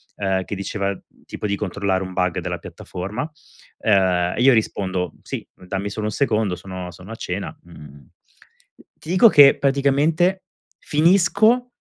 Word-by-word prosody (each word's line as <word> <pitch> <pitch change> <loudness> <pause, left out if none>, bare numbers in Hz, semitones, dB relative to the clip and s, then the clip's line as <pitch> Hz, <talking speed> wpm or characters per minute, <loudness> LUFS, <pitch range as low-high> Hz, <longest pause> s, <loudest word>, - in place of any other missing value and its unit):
ehm, 95 -1 -1
che 100 - -5
diceva 100 0 -3 0.3
tipo 105 - -5
di 100 - 0
controllare 95 -1 -2
un 95 0 -7
bug 90 -2 0
della - - -4
piattaforma. 100 - -6 0.5
Ehm, 90 -4 +2
io 130 +1 +5
rispondo: 95 -6 -1
"Sì, - - -6
dammi 95 +2 -5
solo 105 +1 -4
1 - - -2
secondo, 110 -6 0
sono 90 0 -8
sono 90 +5 -12
a 115 - -6
cena", 95 -2 -5
mhmm, 75 -4 -14 0.9
ti 155 - -11
dico 185 +6 +6
che, 140 -5 +7
praticamente, 145 +7 +1 0.4
finisco 200 +9 +3
100 Hz, 140 wpm, -21 LUFS, 95-140 Hz, 0.9 s, che